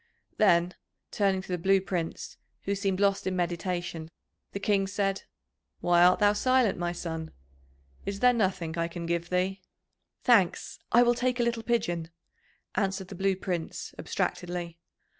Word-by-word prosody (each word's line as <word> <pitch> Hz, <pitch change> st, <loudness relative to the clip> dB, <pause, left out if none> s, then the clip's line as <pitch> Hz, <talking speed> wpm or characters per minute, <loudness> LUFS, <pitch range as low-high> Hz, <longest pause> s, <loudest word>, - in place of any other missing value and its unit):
Then, 175 Hz, -3 st, +4 dB, 0.4 s
turning 195 Hz, -2 st, +1 dB
to -, -, -12 dB
the 180 Hz, -1 st, -2 dB
Blue 195 Hz, +3 st, +4 dB
Prince, 175 Hz, -3 st, -4 dB, 0.3 s
who 200 Hz, -, -1 dB
seemed 195 Hz, -1 st, -1 dB
lost 200 Hz, -1 st, +2 dB
in 185 Hz, -, -1 dB
meditation, 175 Hz, -2 st, -2 dB, 0.4 s
the 200 Hz, -, -4 dB
King 200 Hz, -2 st, +1 dB
said: 195 Hz, -1 st, -1 dB, 0.5 s
"Why 175 Hz, 0 st, +4 dB
art 180 Hz, +1 st, +6 dB
thou 205 Hz, -1 st, +4 dB
silent, 255 Hz, -2 st, +2 dB
my 175 Hz, 0 st, -1 dB
son? 165 Hz, -2 st, -5 dB, 0.7 s
Is 200 Hz, 0 st, -4 dB
there 250 Hz, +1 st, +5 dB
nothing 185 Hz, -7 st, -1 dB
I 165 Hz, -, +1 dB
can 170 Hz, 0 st, -6 dB
give 170 Hz, 0 st, -2 dB
thee?" 185 Hz, +1 st, 0 dB, 0.6 s
"Thanks, 205 Hz, -8 st, +3 dB
I 240 Hz, +2 st, +7 dB
will 240 Hz, 0 st, +4 dB
take 250 Hz, +1 st, -1 dB
a -, -, +3 dB
little 235 Hz, -1 st, 0 dB
pigeon," 175 Hz, -8 st, -1 dB, 0.6 s
answered 195 Hz, -2 st, -1 dB
the -, -, -7 dB
Blue 195 Hz, +1 st, +1 dB
Prince 180 Hz, -3 st, -4 dB
abstractedly. 175 Hz, -1 st, -3 dB
190 Hz, 155 wpm, -28 LUFS, 175-205 Hz, 0.7 s, I